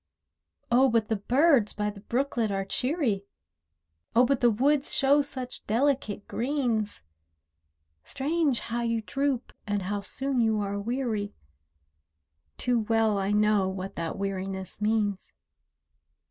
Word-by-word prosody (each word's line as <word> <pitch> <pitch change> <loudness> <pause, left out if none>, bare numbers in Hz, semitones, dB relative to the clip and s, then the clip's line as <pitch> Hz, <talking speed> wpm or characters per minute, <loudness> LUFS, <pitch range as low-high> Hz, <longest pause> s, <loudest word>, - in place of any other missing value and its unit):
Oh, 260 +3 +5
but 230 -2 +1
the 220 - +2
birds 255 +1 +3
by 210 0 -2
the 205 - -12
brooklet 240 0 -1
are 195 -1 -2
cheery, 250 - 0 0.9
Oh, 245 +2 +6
but 275 0 +1
the 240 - +6
woods 275 +6 +2
show 280 +1 +5
such 260 -3 -6
delicate 235 -3 0
greens, 235 - -1 1.0
Strange 290 - 0
how 235 +1 -3
you 230 -1 -1
droop 270 +4 -2
and 205 -1 -1
how 205 +2 -2
soon 265 +5 -2
you 220 -2 +2
are 200 0 -2
weary— 220 -2 -2 1.2
Too 245 -1 +1
well 220 -1 +2
I 195 0 -1
know 210 -2 +3
what 190 0 -6
that 165 +2 -4
weariness 195 0 -4
means. 210 -2 0
225 Hz, 130 wpm, -27 LUFS, 205-260 Hz, 1.2 s, Oh